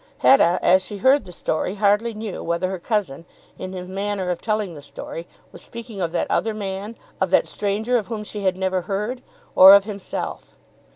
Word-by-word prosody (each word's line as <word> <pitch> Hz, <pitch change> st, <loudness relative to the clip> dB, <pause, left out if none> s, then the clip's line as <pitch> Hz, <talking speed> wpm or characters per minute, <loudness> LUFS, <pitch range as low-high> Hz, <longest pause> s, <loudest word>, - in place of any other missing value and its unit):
Hetta 180 Hz, -10 st, +6 dB
as 185 Hz, +1 st, +5 dB
she 205 Hz, +2 st, -7 dB
heard 265 Hz, +8 st, +3 dB
the 180 Hz, -, -10 dB
story 175 Hz, +2 st, -2 dB
hardly 210 Hz, +3 st, +2 dB
knew 215 Hz, -2 st, -6 dB
whether 170 Hz, +2 st, -1 dB
her 190 Hz, -, -4 dB
cousin, 185 Hz, -, -2 dB, 0.4 s
in 185 Hz, -, -6 dB
his 180 Hz, -1 st, -6 dB
manner 195 Hz, -1 st, -2 dB
of 175 Hz, -, -4 dB
telling 215 Hz, -5 st, -1 dB
the 145 Hz, -, -10 dB
story, 165 Hz, +3 st, -8 dB, 0.2 s
was -, -, -13 dB
speaking 230 Hz, -4 st, -8 dB
of 170 Hz, -2 st, -1 dB
that 175 Hz, -, 0 dB
other 220 Hz, -1 st, 0 dB
man, 200 Hz, +1 st, -5 dB, 0.3 s
of 190 Hz, -, +2 dB
that 185 Hz, -, +4 dB
stranger 215 Hz, +4 st, -1 dB
of 220 Hz, -, -3 dB
whom 220 Hz, -2 st, -5 dB
she 210 Hz, 0 st, -7 dB
had 190 Hz, -2 st, 0 dB
never 190 Hz, -1 st, 0 dB
heard, 210 Hz, +7 st, -3 dB, 0.3 s
or 190 Hz, +1 st, +10 dB
of 200 Hz, -, +5 dB
himself. 200 Hz, -2 st, -6 dB
200 Hz, 195 wpm, -22 LUFS, 185-215 Hz, 0.4 s, or